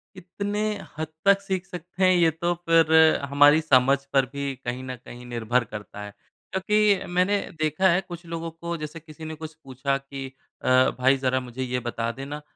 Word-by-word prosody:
कितने 200 +3 -4 0.4
हद 160 0 -3 0.2
तक 200 0 +5
सीख 190 -2 -3
सकते 180 0 -5
हैं, 185 0 +6
ये 170 -2 +4
तो 170 +2 -1 0.2
फिर 165 -1 +5 0.4
हमारी 145 +2 +6
समझ 135 -3 +4 0.2
पर 135 -1 +4
भी 140 -1 -3
कहीं 125 +1 -3
न 130 0 -5
कहीं 120 +1 -10
निर्भर 120 0 0
करता 105 -1 -7
है। 105 - -8 0.4
क्योंकि 205 +1 +2
मैंने 185 +3 +2 0.2
देखा 155 +5 +2
है 175 +1 +3
कुछ 175 -2 -10
लोगों 165 0 -5
को 170 +1 -5
जैसे 155 +1 -7
किसी 160 0 -12
ने 155 0 -6
कुछ 160 0 -8
पूछा 135 +1 -2
कि 135 0 -8 0.4
अ, 130 0 +4
"भाई, 130 +2 +4
ज़रा 130 -1 0
मुझे 125 0 -6
ये 125 0 -2
बता 115 -1 -3
देना।" 140 +4 -7
155 Hz, 185 wpm, -25 LUFS, 130-175 Hz, 0.4 s, हैं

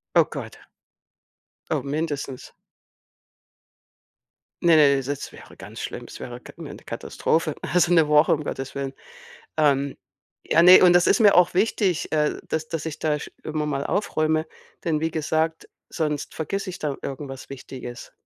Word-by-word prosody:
Oh, - - +7
Gott. - - -8 1.1
Oh, - - 0
mindestens. 140 -3 -4 2.1
Ne, 170 -1 +6
ne, 140 -3 +5
das 140 +1 -5
wäre - - -14
ganz - - -10
schlimm. - - -5
Es - - -10
wäre 120 0 -8
Ka - - -13
'ne - - -8
Katastrophe, 160 -1 -1
also 175 -1 +2
'ne 160 -3 +5
Woche, 150 +1 +5
um 150 - -4
Gottes 135 -2 -5
Willen. 140 -1 -3 0.7
Ähm, 140 -2 +2 0.5
ja, 165 - +4
ne, 180 +1 +9
und 180 -1 +7
das 175 0 +5
ist - - +3
mir 205 -2 +6
auch 180 0 +5
wichtig, 190 -2 +1
äh, 150 -1 +1
dass 160 0 -2
dass 165 -2 -4
ich 160 - -5
da 150 -1 0
sch - - -8
immer 155 -1 -2
mal 140 -1 -2
aufräume, 155 -5 0 0.4
denn 155 -3 0
wie 160 +1 0
gesagt, 160 +1 -1 0.2
sonst 150 -2 -2
vergesse 195 +4 -3
ich 180 - -8
da 145 -3 -3
irgendwas 135 -1 -7
Wichtiges. 125 -2 -9
155 Hz, 160 wpm, -24 LUFS, 140-165 Hz, 2.1 s, ne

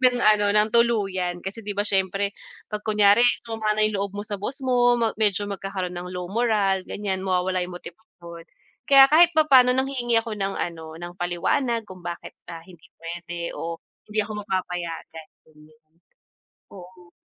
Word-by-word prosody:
ng 250 -1 +4
ano, 210 -1 +4
ng 210 +1 +3
tuluyan 195 -7 +1
kasi 200 +4 -5
'di 205 - -3
ba - - +1
siyempre 195 0 0 0.4
'pag 210 -1 -5
kunyare 210 +1 +5 0.2
sumama 220 -2 -1
na - - +4
yung 215 -1 -2
loob 200 -1 -3
mo - - -3
sa 205 - -4
boss 255 +7 -5
mo, 245 -1 +3 0.2
medyo 205 -1 +1
magkakaroon 195 -2 -5
ng 180 +1 -6
low 180 -1 -5
morale 200 -4 +1
gan'yan 195 -2 -3
mawawala 185 0 0
yung 180 - -9
motibasyon. 170 -2 -12 0.4
Kaya 275 -1 +8
kahit 340 +2 +6
papaano 265 -5 +6
nanghihingi 260 -3 0
ako 225 -2 -6
ng 195 0 -2
ano, 160 -2 -5
ng 175 0 -7
paliwanag 225 +8 0
kung 185 -1 -11
bakit, 175 -1 -7 0.2
ah, 165 - -8
hindi 175 -2 -17
p'wede 170 0 -6
o 165 0 -5 0.3
hindi 210 +1 -5
ako 215 - -7
mapapayagan, 175 -4 -5 1.5
oo. 180 -1 -14
195 Hz, 160 wpm, -24 LUFS, 180-225 Hz, 1.5 s, Kaya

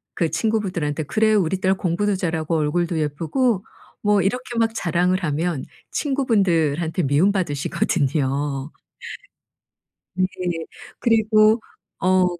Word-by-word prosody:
그 165 - 0
친구분들한테 175 -6 -1
"그래. 215 +7 +2
우리 190 -2 +1
딸 190 0 +3
공부도 195 +3 0
잘하고 165 -2 -1
얼굴도 160 +2 0
예쁘고" 170 - 0 0.4
뭐 205 -1 +3
이렇게 240 +5 -2
막 225 0 +2
자랑을 180 0 +1
하면 155 -1 -1 0.3
친구분들한테 180 - +1
미움 145 +9 +3
받으시거든요. 145 -4 -1 1.4
네. 185 - +2 0.7
그리고 220 -1 +4 0.4
어 185 0 +3
180 Hz, 255 characters per minute, -22 LUFS, 155-210 Hz, 1.4 s, 그리고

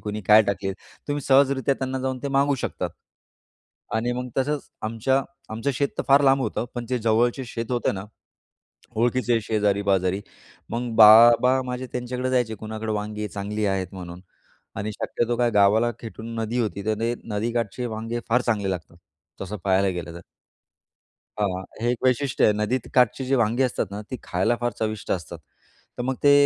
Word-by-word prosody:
कुणी 105 0 -4
काय 105 +3 +7
टाकली, 100 -1 -2 0.4
तुम्ही 145 0 -1
सहजरीत्या 135 0 +3
त्यांना 130 0 -3
जाऊन 130 0 -2
ते 140 - -2
मागू 140 +1 +3
शकतात - - -3 1.0
आणि 120 +2 0
मग 125 +1 -4
तसंच 145 +2 -1
आमच्या 115 +5 +1 0.3
आमचं 115 +6 -1
शेत 140 +3 +1
तर - - +1
फार 140 +1 +6
लांब 135 0 +4
होतं 110 +1 -2
पण 120 -1 -4
ते 125 - +1
जवळचे 115 +4 +1
शेत 115 0 -5
होतं 120 -4 0
ना, 95 0 -6 0.9
ओळखीचे 120 0 +2
शेजारी-पाजारी. 100 -3 +1 0.5
मग 120 0 -2
बाबा 120 +4 +8
माझे 125 +1 -4
त्यांच्याकडे 125 +1 -3
जायचे 125 -3 +1
कुणाकडे 110 +1 -5
वांगे 105 0 -3
चांगली 105 +1 -3
आहेत 95 -2 0
म्हणून 90 -1 -8 0.6
आणि 105 +2 -3
शक्यतो 120 +3 -2
काय 120 -1 +3
गावाला 105 +3 +4
खेटून 115 0 -8
नदी 115 +3 -2
होती, 100 -3 -3
तर 110 - +2
ते 115 +1 0
नदीकाठचे 115 +2 -2
वांगे 115 +1 -4
फार 125 +2 +3
चांगले 105 -4 0
लागतात, 85 -2 -6 0.5
तसं 100 +3 -5
पाहायला 95 0 +3
गेलं 85 0 -7
तर. 85 - -8 1.2
हां, 95 -3 -1 0.2
हे 120 +1 +1
एक 120 - -4
वैशिष्ट्य 130 +1 +2
आहे, 105 - +5
नदीत 105 +4 -1
काठची 125 +1 +3
जी 135 +1 +1
वांगे 120 +1 +2
असतात 125 - 0
ना, 100 - -5
ती 130 - -3
खायला 100 +7 0
फार 120 0 0
चविष्ट 110 -1 -3
असतात. 85 -5 -5 0.6
तर - - -1
मग 130 +1 -1
ते 145 - +6
115 Hz, 170 wpm, -24 LUFS, 105-125 Hz, 1.2 s, बाबा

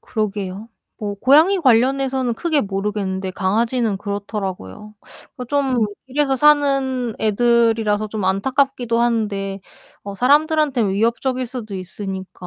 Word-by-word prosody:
그러게요. 205 -1 -4 0.3
뭐 205 -1 -4
고양이 305 - +4
관련해서는 260 -1 +2
크게 310 +2 0
모르겠는데 195 -1 -3
강아지는 220 +3 0
그렇더라고요. 200 - -6 0.5
좀 265 -5 +1 0.2
길에서 270 0 0
사는 275 -4 +2
애들이라서 220 -1 +2
좀 210 -2 -4
안타깝기도 240 +4 0
한데 205 -4 -1 0.4
어 200 0 -7
사람들한테 290 - +2
위협적일 235 +6 0
수도 235 -5 -7
있으니까 190 0 -7
225 Hz, 315 characters per minute, -20 LUFS, 200-265 Hz, 0.5 s, 고양이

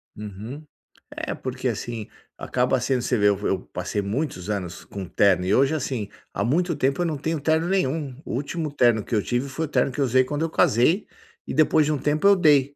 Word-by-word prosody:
Uhum. 105 +8 -8 0.5
É - - -3
porque, 130 0 -4
assim, 115 -1 -4 0.3
acaba 125 +1 0
sendo 130 0 0
você 125 0 0
vê 105 - +4
eu 100 - +2
eu 95 - +1
passei 90 +3 -2
muitos 100 - -3
anos 95 -5 -4
com 100 -2 -6
terno 90 0 +3
e 95 - +1
hoje 140 +6 +3
assim, 125 -8 -3 0.2
há 100 - -1
muito 170 - +1
tempo 140 +3 0
eu 175 - +1
não 155 -3 -1
tenho 160 +3 -2
terno 160 +3 +1
nenhum, 155 -7 0
o - - -5
último 150 +3 -3
terno 120 -6 +3
que - - -8
eu 105 - +3
tive 125 +5 -1
foi 160 +5 -2
o - - -7
terno 140 - +1
que 130 - -7
eu 135 - +4
usei 130 +1 +4
quando 145 +3 -3
eu 165 - -1
casei, 155 - +3 0.4
e - - -5
depois 155 0 +4
de 155 - 0
um 150 - +1
tempo 150 +6 0
eu 200 - +7
dei. 145 -5 +4
130 Hz, 225 wpm, -24 LUFS, 110-155 Hz, 0.5 s, eu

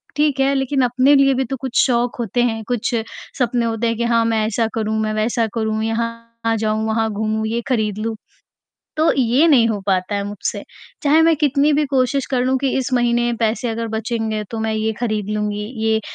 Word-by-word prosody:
ठीक 295 -2 +1
है 270 +1 +3
लेक़िन 270 0 0
अपने 255 +3 +4
लिए 275 -1 +4
भी 265 0 0
तो 270 - -4
कुछ 265 -2 +2
शौक 245 -1 0
होते 235 +1 0
हैं, 225 -2 -1
कुछ 245 -1 -1 0.4
सपने 240 -1 +1
होते 230 0 -1
हैं 230 -1 -1
कि 235 - -1
हाँ, 230 -1 +2
मैं 225 -1 +1
ऐसा 225 +1 0
करूँ, 220 -1 -1
मैं 215 0 -1
वैसा 225 +1 0
करूँ, 220 -1 -1
यहाँ 230 0 -3
जाऊँ, 215 0 -1
वहाँ 220 0 0
घूमूँ, 220 +1 -1
ये 230 +2 -1
ख़रीद 215 -5 0
लूँ, 225 +1 -2 0.8
तो 315 +1 +4
ये 260 +6 +3
नहीं 250 -7 +5
हो 215 -2 -1
पाता 190 +1 0
है 200 - -1
मुझसे। 205 - -4 0.4
चाहे 300 +3 +5
मैं 325 0 +4
कितनी 290 0 +2
भी 300 +1 +2
कोशिश 270 +1 +1
कर 255 - +1
लूँ 265 +1 +2
कि 275 - +1
इस 265 0 -2
महीने 240 -1 +2
पैसे 225 +1 0
अगर 230 0 -3
बचेंगे 220 -1 -2
तो 225 - -4
मैं 220 0 -1
ये 220 0 0
ख़रीद 215 -4 -2
लूँगी, 210 0 -2 0.2
ये 220 0 +2
230 Hz, 210 wpm, -19 LUFS, 220-255 Hz, 0.8 s, नहीं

